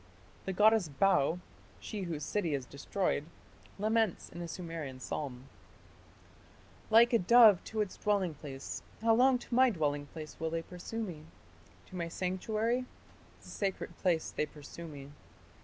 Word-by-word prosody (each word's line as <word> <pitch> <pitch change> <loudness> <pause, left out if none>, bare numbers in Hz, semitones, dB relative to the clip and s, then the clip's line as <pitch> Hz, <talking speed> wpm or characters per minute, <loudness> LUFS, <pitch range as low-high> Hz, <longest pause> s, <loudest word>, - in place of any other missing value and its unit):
The 190 - -1
goddess 215 -1 +5
Bau, 160 0 +3 0.4
"she 210 - -5
whose 165 -5 -3
city 175 -8 0
is 135 -2 -4
destroyed", 145 +4 -1 0.5
laments 215 -1 +1
in 170 - -8
a 170 - -4
Sumerian 165 -6 -6
psalm: 130 -1 -5 1.4
Like 235 +3 +6
a 230 - +6
dove 220 0 +7
to 220 -1 -2
its 205 - -3
dwelling 200 -5 +1
place, 140 -2 -7 0.2
how 225 0 +5
long 255 +2 +5
to 245 - -10
my 260 +1 +6
dwelling 145 -7 -1
place 155 0 -9
will 160 - -1
they 165 0 -2
pursue 185 +7 -5
me, 160 -7 -7 0.6
To - - -10
my 170 -2 -2
sanctuary... 215 +8 -1 0.6
the - - -14
sacred 195 -2 -3
place 170 -4 +1
they 150 - -1
pursue 150 +3 -10
me.... 140 -2 -10
180 Hz, 150 wpm, -32 LUFS, 150-215 Hz, 1.4 s, dove